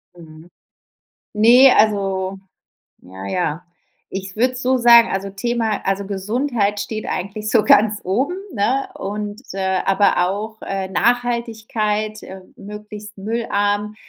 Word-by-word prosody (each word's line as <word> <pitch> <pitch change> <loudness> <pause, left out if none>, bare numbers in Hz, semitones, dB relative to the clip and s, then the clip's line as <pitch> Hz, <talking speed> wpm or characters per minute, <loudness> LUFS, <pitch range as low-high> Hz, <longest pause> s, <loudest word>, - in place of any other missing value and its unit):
Mhm. 160 0 -14 0.8
Ne, 240 +5 +6
also, 195 -3 +1 0.6
ja, 95 +2 -10
ja. 165 - -2 0.5
Ich 190 0 -6
würde 250 +2 +2
es 255 - -7
so 260 +1 +2
sagen, 235 -1 +7
also 195 +1 -3
Thema 225 +2 -2
also 195 +1 -1
Gesundheit 210 +2 -1
steht 215 +1 -5
eigentlich 210 +3 -4
so 225 -3 +3
ganz 210 +1 +4
oben, 260 - -1 0.2
ne, 245 +6 0
und 205 +2 -5
äh, 190 -1 -1
aber 195 -2 +3
auch, 215 +3 -5
äh, 195 -1 -4
Nachhaltigkeit, 220 -2 -1
äh, 190 0 -10
möglichst 210 0 -10
müllarm, 205 -1 -1
210 Hz, 125 wpm, -20 LUFS, 195-230 Hz, 0.8 s, sagen